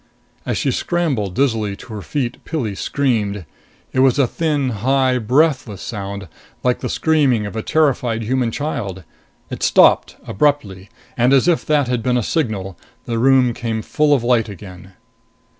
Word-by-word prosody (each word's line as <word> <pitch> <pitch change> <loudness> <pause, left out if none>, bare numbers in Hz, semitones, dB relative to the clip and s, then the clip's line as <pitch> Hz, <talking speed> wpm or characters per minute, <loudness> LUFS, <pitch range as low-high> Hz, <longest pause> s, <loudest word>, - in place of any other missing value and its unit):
As - - -1
she - - 0
scrambled 140 - -1
dizzily 110 -6 0
to 110 - -11
her 105 - -5
feet, 130 +1 -4
Pilli 130 -11 -3
screamed. 105 - -1 0.5
It - - 0
was 130 0 +4
a 140 - +4
thin, 145 0 -1
high, 130 +3 +1
breathless 125 - +1
sound 100 -3 -6 0.4
like 125 -1 +1
the - - -4
screaming 140 -9 +2
of 100 - -7
a 110 - -2
terrified 125 -6 +1
human 125 +1 0
child. 105 - -4 0.5
It - - -6
stopped - - +4
abruptly. 100 -7 -1 0.3
And, 125 +2 +3
as 135 +4 +4
if 175 -2 +2
that 150 -4 +2
had 125 -1 -1
been 125 +2 +1
a 120 - 0
signal, 105 - -2 0.3
the 115 -1 -2
room 130 -1 +4
came 110 -2 -3
full 150 +5 +1
of 125 - -1
light 120 -3 +2
again. 95 -2 -11
120 Hz, 160 wpm, -19 LUFS, 105-140 Hz, 0.5 s, was